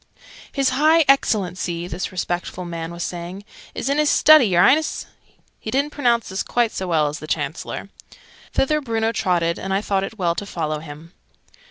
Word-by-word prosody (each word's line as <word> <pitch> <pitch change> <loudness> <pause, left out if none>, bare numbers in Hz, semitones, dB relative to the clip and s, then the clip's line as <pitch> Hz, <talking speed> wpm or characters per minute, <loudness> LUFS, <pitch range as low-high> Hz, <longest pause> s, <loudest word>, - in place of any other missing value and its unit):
"His 275 -2 +1
High 310 +4 +4
Excellency," 180 -9 +1
this 180 +3 -4
respectful 180 0 -3
man 165 -1 -5
was 170 0 -5
saying, 180 +3 -6 0.3
"is - - -3
in 280 +2 +1
his 300 -1 +3
Study, 310 -4 +7
y'reince!" 255 - +3 0.5
(He - - -6
didn't 280 +3 0
pronounce 240 -6 +1
this 190 0 -2
quite 240 -2 0
so 190 - -4
well 160 -3 +2
as 145 +1 -5
the 155 - -9
Chancellor.) - - -3 0.6
Thither 300 +3 +1
Bruno 225 -3 -1
trotted, 175 -6 0
and 190 - -5
I 195 - +1
thought 195 -2 0
it 220 +3 -6
well 175 -4 +1
to 205 - -5
follow 155 -4 -3
him. 155 +2 -11
190 Hz, 175 wpm, -21 LUFS, 170-260 Hz, 0.6 s, Study